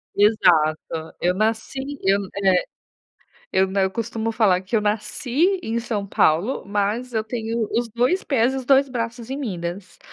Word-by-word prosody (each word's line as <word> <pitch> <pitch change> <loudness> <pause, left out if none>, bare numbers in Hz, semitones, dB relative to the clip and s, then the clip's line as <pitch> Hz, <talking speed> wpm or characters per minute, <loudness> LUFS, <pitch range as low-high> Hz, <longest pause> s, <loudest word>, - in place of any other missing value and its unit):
Exato, 165 -6 +2
eu 180 +1 +2
nasci 220 +6 -1 0.2
eu, 195 +1 +3 0.2
eh, 185 -2 +3 0.9
eu 190 0 +3
na 190 0 0
eu 190 - +1
costumo 225 +1 -3
falar 205 -5 +3
que 190 +4 -2
eu - - +3
nasci 245 - 0
em 230 +1 -2
São 210 -4 -3
Paulo, 185 +7 +1
mas 210 +5 -1
eu 220 -1 -1
tenho 225 -1 -3
os 235 0 0
2 245 - +1
pés 255 -2 +2
e - - -2
os 260 - -4
2 275 +1 +4
braços 235 -1 -4
em 270 - -2
Minas. 185 -7 -5
220 Hz, 165 wpm, -22 LUFS, 190-240 Hz, 0.9 s, 2